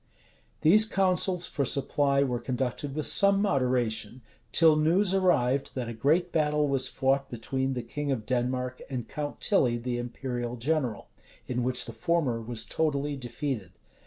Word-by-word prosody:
These 210 +8 +6
counsels 185 -2 +2
for 140 - -2
supply 140 +1 +2
were 125 -3 -1
conducted 130 +2 -3
with 155 - -2
some 200 0 +5
moderation; 125 - 0 0.3
till 160 -2 +6
news 175 +6 +2
arrived, 140 -9 +1
that 125 -3 -3
a 120 - -5
great 155 +10 +1
battle 150 -1 +1
was 135 -2 0
fought 135 +1 0
between 130 +3 -3
the 125 - -3
king 145 +4 -4
of 115 -5 -3
Denmark 125 0 -2
and 125 -4 -4
Count 145 -1 -5
Tilly, 125 - +2
the 120 0 -3
imperial 120 0 -4
general; 125 -2 -2 0.4
in 125 0 -2
which 125 0 +1
the - - -8
former 145 -9 0
was 115 0 -3
totally 145 -2 -1
defeated. 125 - -5
135 Hz, 155 wpm, -28 LUFS, 125-150 Hz, 0.4 s, These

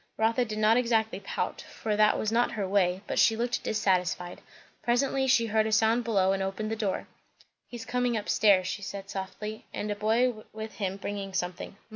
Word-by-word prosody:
Rotha 230 +3 +2
did 215 -2 -5
not 215 +2 +4
exactly 225 -4 +1
pout, 200 - -3
for 215 -2 -4
that 210 0 +4
was 215 - -1
not 240 +1 +2
her 205 -4 -2
way; 185 -1 +2
but - - -1
she 225 - +5
looked 240 +2 -1
dissatisfied. 180 -4 0 0.4
Presently 265 +2 +1
she 245 -3 +4
heard 220 0 +1
a - - -2
sound 220 +2 +3
below, 195 -5 +2
and 195 0 0
opened 195 +3 -3
the - - 0
door. 205 -4 -2 0.6
"He's 240 -2 -8
coming 245 -1 0
up 210 - -5
stairs," 200 -4 +4
she 200 - -4
said 195 0 -7
softly, 210 +3 -6
"and 210 - -3
a - - -1
boy 220 +2 +1
with 220 0 -6
him 195 -2 -2
bringing 195 -1 -5
something. 180 +2 -4
215 Hz, 195 wpm, -28 LUFS, 195-230 Hz, 0.6 s, she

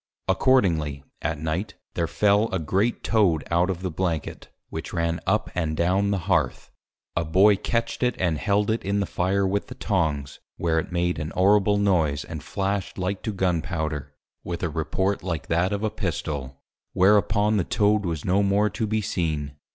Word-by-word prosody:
Accordingly, 90 - +2 0.2
at 75 0 -1
Night, 80 +6 -3 0.2
there 85 -1 0
fell 105 +4 +3
a 95 - 0
great 95 +8 0
Toad 95 -9 +2
out 85 +2 +3
of 90 -1 -3
the 95 - -2
Blanket, 80 -2 -3 0.2
which - - -6
ran 85 0 0
up 105 +3 +1
and 80 -3 -1
down 95 +4 +2
the 100 - +1
Hearth. 85 -10 0 0.4
A 85 - +1
Boy 95 +6 +5
catch't 115 +4 -2
it, 125 -1 +2
and 85 -5 +1
held 105 +1 +1
it 115 - -1
in 100 +1 0
the 100 - +1
Fire 95 +2 0
with 100 +2 -1
the - - -9
Tongs: 80 - -1 0.2
where 80 -1 +1
it - - -5
made 90 -1 0
an 75 0 -3
horrible 100 +2 +4
Noise, 80 -8 +1
and 80 -2 -7
Flash'd 100 +4 -2
like 95 +1 -2
to 110 - -2
Gun 90 -4 0
Powder, 80 -5 -4 0.3
with 85 0 -5
a 85 - +1
report 80 +6 -1
like 85 -5 -3
that 85 +3 +2
of 100 +1 -2
a 110 - 0
Pistol: 75 - -4 0.3
Whereupon 105 +2 +3
the 95 - +2
Toad 105 +1 +2
was 85 -5 -3
no 95 +1 +3
more 100 +1 +2
to 110 +1 -2
be 110 +1 0
seen. 80 -8 -2
95 Hz, 185 wpm, -25 LUFS, 80-100 Hz, 0.4 s, Boy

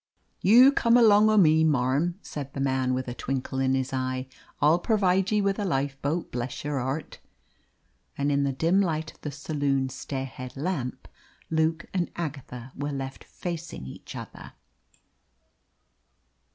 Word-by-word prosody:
"You 245 +7 +8
come 235 -3 +4
along 215 -2 +6
o' 215 - +3
me, 160 -4 +6
marm," 145 +4 +1
said 140 -2 -7
the - - -5
man, 130 -1 +1
with 130 0 -3
a 120 - -3
twinkle 130 +1 -3
in 135 0 +2
his 130 0 -2
eye. 130 0 -2 0.3
"I'll 155 +4 +4
pervide 190 -2 +2
ye 210 -1 +3
with 195 +1 0
a - - 0
lifeboat, 140 0 -1
bless 120 +1 -4
yer 145 -1 -1
heart!" 135 +5 -4 1.0
And 140 +1 +1
in 140 0 +2
the 140 - +1
dim 165 +8 +2
light 160 -4 -2
of - - -28
the 150 - -4
saloon 145 -2 -1
stairhead 130 -1 -6
lamp, 140 -5 -3 0.4
Luke 160 0 +1
and 180 -3 0
Agatha 135 -6 -6
were 145 +1 -3
left 135 -1 -5
facing 170 - -6
each 65 - -10
other. - - -9
145 Hz, 150 wpm, -27 LUFS, 130-175 Hz, 1.0 s, You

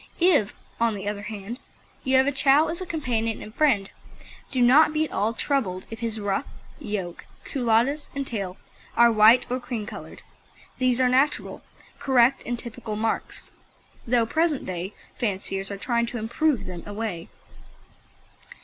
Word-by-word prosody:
If, 330 - +3 0.2
on 230 -2 +2
the 200 0 -6
other 205 0 -3
hand, 210 +3 -7 0.4
you 260 0 +3
have 260 - +5
a 285 - +2
Chow 285 +3 +4
as 335 +3 -4
a 370 - -5
companion 235 -9 -1
and 215 - -10
friend, 235 -9 +2 0.6
do 260 - -2
not 270 +6 +6
be 310 0 +2
at - - -10
all 210 +3 +1
troubled 215 -10 -1
if 225 - -7
his 225 -2 -3
ruff, 200 -1 -1 0.3
yoke, 190 -5 -5 0.2
culottes 250 +3 +1
and 275 0 -2
tail 195 -7 -4 0.4
are 235 0 +7
white 225 +3 +6
or 250 +1 -2
cream 240 -4 -4
coloured. - - -9 0.6
These 255 -1 +2
are 255 - +4
natural, 265 +4 +1 0.4
correct 265 -1 +4
and 240 0 -1
typical 235 -2 -6
marks, 225 +1 -3 0.6
though 235 -1 +3
present 315 +3 0
day 185 +2 -5 0.2
fanciers 195 -3 -2
are 200 - -5
trying 235 +2 0
to 240 - -5
"improve" 245 +5 0
them 180 -2 -7
away. 205 -5 -4
235 Hz, 160 wpm, -25 LUFS, 210-265 Hz, 0.6 s, are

